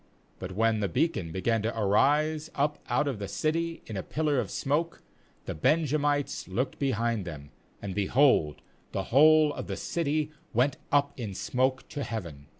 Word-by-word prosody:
40But 95 0 -6
when 110 +2 +2
the 100 -2 0
beacon 95 - 0
began 110 +6 0
to 115 +1 -2
arise 150 +9 +2
up 145 +1 0
out 150 - +1
of 130 -7 -2
the 100 - -4
city 165 +8 -2
in 110 - -7
a 95 - -2
pillar 150 - 0
of - - -2
smoke, 155 +5 -1 0.4
the - - -3
Benjamites 145 - +1
looked 125 +8 -2
behind 115 -5 0
them, 75 -5 -8 0.3
and, 100 -2 -4
behold, 100 - +2 0.3
the 95 - -1
whole 155 +2 +6
of - - -6
the - - -4
city 155 -2 -1 0.2
went 130 +3 +2
up 145 0 +3
in 105 -5 -5
smoke 130 +5 0
to 145 -2 -4
heaven. 85 -11 -6
130 Hz, 165 wpm, -28 LUFS, 100-150 Hz, 0.4 s, whole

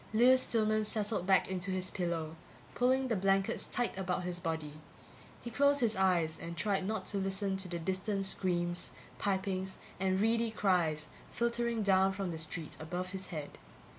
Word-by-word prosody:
Lewis 255 +3 +7
Stillman 215 -3 +2
settled 210 -3 -1
back 190 -1 +4
into 185 0 -2
his 185 0 -1
pillow, 165 -3 -2 0.4
pulling 260 +2 +2
the 230 - +1
blankets 195 0 +1
tight 245 -1 -1
about 185 -1 -1
his 175 0 -3
body. 160 -4 -3 0.7
He 235 - -5
closed 285 +4 +4
his 225 -4 +2
eyes 175 -4 +2
and 170 0 -6
tried 195 +1 0
not 215 -3 -2
to 200 - 0
listen 195 0 -1
to 190 -1 -4
the 175 -1 -3
distant 190 +3 -1
screams, 175 -2 -1 0.3
pipings 190 -1 -1 0.2
and 190 0 +1
reedy 230 +2 +2
cries 175 -8 +1 0.2
filtering 235 -1 0
down 190 -1 +4
from 190 -2 -3
the 160 - -4
street 160 0 -4
above 175 +3 -4
his 190 -1 -5
head. 150 -4 -6
190 Hz, 165 wpm, -33 LUFS, 175-215 Hz, 0.7 s, Lewis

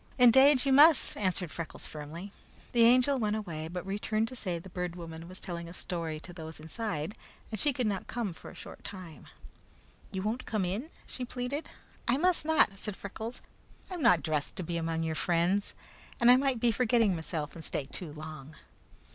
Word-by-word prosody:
"Indade, 265 +2 +7
you 270 - +4
must," 295 +2 +7
answered 185 -4 -1
Freckles 170 -2 -6
firmly. 160 +6 -7 0.4
The 235 -1 +5
Angel 255 +3 +5
went 215 -2 +1
away, 165 -7 -4
but 175 +1 -5
returned 215 +3 0
to 255 - -8
say 185 -7 -2
that 170 - -6
the 190 - -10
Bird 180 -1 -3
Woman 165 -1 -8
was 185 - -6
telling 170 -1 -5
a - - -9
story 165 -4 -4
to 175 - -9
those 160 -2 -8
inside 160 +1 -3 0.4
and 215 - -2
she 295 - +3
could 250 -2 -1
not 200 -3 -1
come 230 -7 -2
for - - -11
a - - -12
short - - -10
time. 180 -5 -9 0.8
"You 190 0 -3
won't 225 +4 -2
come 210 -4 0
in?" 210 - -3 0.2
she 255 - -5
pleaded. 250 +4 -4 0.4
"I 240 +3 +3
must 355 0 +2
not," 250 -11 +4
said 210 -2 -4
Freckles. 220 +5 -7 0.5
"I - - -3
am 350 - -4
not 175 - +5
dressed 150 -2 -1
to 185 - -3
be 170 +1 -3
among 165 -1 -1
your 160 -1 -1
friends, 175 +4 +1 0.4
and 240 +1 +7
I - - +9
might 265 -2 +2
be 235 0 +3
forgetting 225 -3 +3
meself 160 -2 -3
and 165 - -9
stay 145 - -2
too 155 +3 -7
long." 155 -1 -9
190 Hz, 200 wpm, -31 LUFS, 165-240 Hz, 0.8 s, I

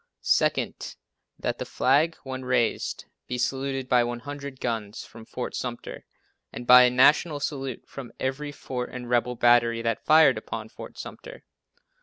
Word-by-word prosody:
Second, - - 0 0.4
That - - -3
the - - -2
flag, 150 +6 +2
when 130 -1 -6
raised 125 -3 -1 0.2
be 125 - -3
saluted 135 +1 -2
by 125 -1 +4
100 140 +3 -6
guns 110 -3 -3
from 115 -1 -13
Fort 125 - -5
Sumter 120 -2 -6 0.5
and 120 - -8
by 125 +1 +9
a - - +4
national 145 +5 +4
salute 135 -3 -4
from 130 -4 -9
every 140 +3 -3
fort 125 -3 -5
and 125 -1 -7
rebel 125 0 +1
battery 120 -1 +3
that 115 -1 -1
fired 160 +1 +5
upon - - -7
Fort - - -11
Sumter. - - -10
125 Hz, 150 wpm, -26 LUFS, 120-140 Hz, 0.5 s, by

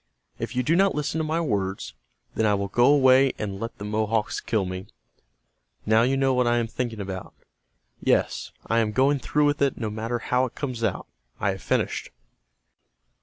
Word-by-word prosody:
If - - -4
you 125 - +1
do 155 +7 +2
not 195 +2 +3
listen 150 +2 -1
to - - 0
my 155 +2 0
words, 100 - -2 0.4
then - - 0
I 105 - +3
will 100 0 -2
go 120 +5 +4
away 135 -1 +5
and 100 -2 -4
let 115 +2 -5
the 100 - -7
Mohawks 110 +1 0
kill 110 -5 0
me. 90 +1 -6 1.0
Now 110 +1 +4
you 130 +3 +2
know 135 -1 +2
what 125 -1 +2
I 120 0 +3
am 120 - +1
thinking 115 -1 -4
about. 95 -2 -6 0.6
Yes, - - 0
I 115 - +2
am 110 -2 0
going 135 +3 +3
through 150 +2 +1
with 145 0 +1
it 140 -2 +2
no 110 -3 -3
matter 115 +3 -2
how 125 +2 +1
it 125 - -8
comes 125 -5 -4
out. - - -1 0.3
I - - +1
have - - -7
finished." - - -1
120 Hz, 195 wpm, -25 LUFS, 105-135 Hz, 1.0 s, away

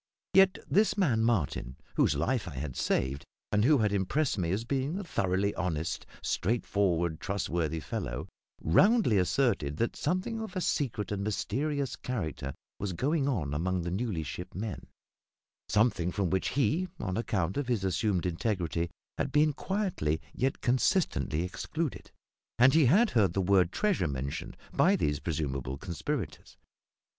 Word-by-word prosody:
Yet 195 0 +6
this 205 -1 +3
man, 130 - +2
Martin, 80 - 0 0.2
whose - - +3
life 110 - 0
I - - -7
had 65 0 -4
saved, 70 +2 0 0.3
and 105 0 +3
who 145 +4 +5
had 105 -4 +1
impressed 125 +10 +1
me 90 -5 -1
as 100 +6 0
being 140 +6 -1
a 200 - -3
thoroughly 100 - 0
honest, 85 -3 -2 0.2
straightforward, 90 -6 0
trustworthy 85 -5 -1
fellow, - - -4 0.3
roundly 190 - +4
asserted 90 - +1
that 115 - 0
something 185 +8 -1
of 220 -2 -6
a - - 0
secret 115 - -1
and 100 -1 -2
mysterious 135 +6 -1
character 80 - -4 0.2
was 100 -2 -2
going 140 - +1
on 80 - -1
among 90 +4 0
the 85 - -3
newly 95 -4 -1
shipped 85 +5 -7
men 105 +1 -5 0.8
something 105 -6 +2
from 95 -3 -1
which 95 0 +1
he, 160 +6 +2
on 95 -3 -2
account 95 -6 -1
of 145 -3 -1
his 120 -6 0
assumed 95 -1 0
integrity, 85 -2 -1 0.3
had - - 0
been 150 0 +4
quietly 180 - -1
yet 130 +2 -1
consistently 125 - +1
excluded; 150 - -4 0.5
and 130 +3 +6
he 160 -2 +6
had 210 - +5
heard 100 -7 +3
the 95 - 0
word 95 -2 +3
"treasure" 205 - +1
mentioned 70 -1 -4 0.2
by - - +4
these 75 -1 0
presumable 70 -5 -3
conspirators. 90 - -4
100 Hz, 150 wpm, -30 LUFS, 85-135 Hz, 0.8 s, Yet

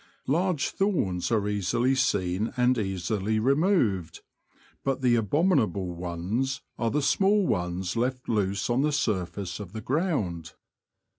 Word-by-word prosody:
Large 165 +1 +1
thorns 120 - 0
are 105 -3 +1
easily 110 +6 +1
seen 105 -6 0
and 125 +1 +3
easily 100 +2 -1
removed, 130 - +1 0.6
but 135 -1 -1
the 125 -2 +4
abominable 110 - +1
ones 90 +10 -2 0.2
are 115 - +1
the 145 +4 0
small 195 +6 +3
ones 90 - -1
left 125 +2 -1
loose 100 -3 0
on 120 +2 +1
the 150 +1 +1
surface 100 -8 -2
of 95 -3 -8
the 110 - -5
ground. 120 - -1
110 Hz, 130 wpm, -27 LUFS, 95-135 Hz, 0.6 s, the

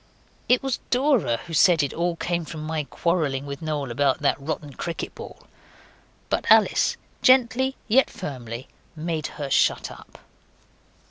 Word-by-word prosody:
It 250 +1 +4
was 270 -3 -1
Dora 250 - +2
who 170 - -9
said 165 -1 +5
it 140 - -2
all 170 0 -1
came 170 0 -2
from 155 0 -7
my 155 -1 -2
quarrelling 150 -5 -1
with 140 +1 -6
Noel 150 -5 -3
about 135 +2 +1
that 140 - +3
rotten 145 -1 -4
cricket 170 +5 -5
ball; - - -11 0.8
but - - -1
Alice, - - +4 0.2
gently 260 +1 +4
yet 255 +5 +4
firmly, 130 - -7 0.3
made 160 -1 -3
her 140 -2 -4
shut - - +2
up. - - -14
160 Hz, 145 wpm, -24 LUFS, 140-190 Hz, 0.8 s, said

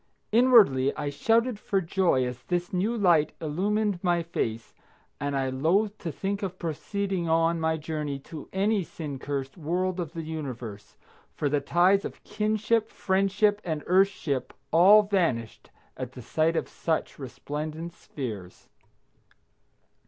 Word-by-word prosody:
Inwardly 215 - +5
I 145 - -2
shouted 225 - +1
for 200 -2 0
joy 170 -7 +1
as 125 0 -5
this 175 0 -2
new 210 +6 0
light 170 -7 +3
illumined 200 +5 0
my 175 -2 +2
face, 115 -8 -3 0.5
and 145 0 -1
I 135 -1 0
loathed 190 +11 +1
to 170 - -4
think 200 +5 -3
of 185 -2 -4
proceeding 185 +2 -2
on 165 +1 +2
my 160 0 +1
journey 150 -2 -3
to 155 +1 -10
any 200 +2 +1
sin 150 -5 -7
cursed 140 +3 -4
world 180 +4 -1
of 170 -2 -4
the 165 -2 -5
universe, 125 -10 -7 0.4
for 145 - 0
the 145 0 +1
ties 180 +7 +3
of - - -7
kinship, 215 +1 0
friendship, 200 +2 +1
and 155 -3 -3
earthship 180 -8 +1 0.2
all 195 +6 +7
vanished 170 - -1 0.3
at 130 -1 -6
the 125 - -10
sight 160 +6 +1
of - - -1
such 160 -2 -2
resplendent 150 +5 -5
spheres. 105 - -8
165 Hz, 140 wpm, -27 LUFS, 145-195 Hz, 0.5 s, all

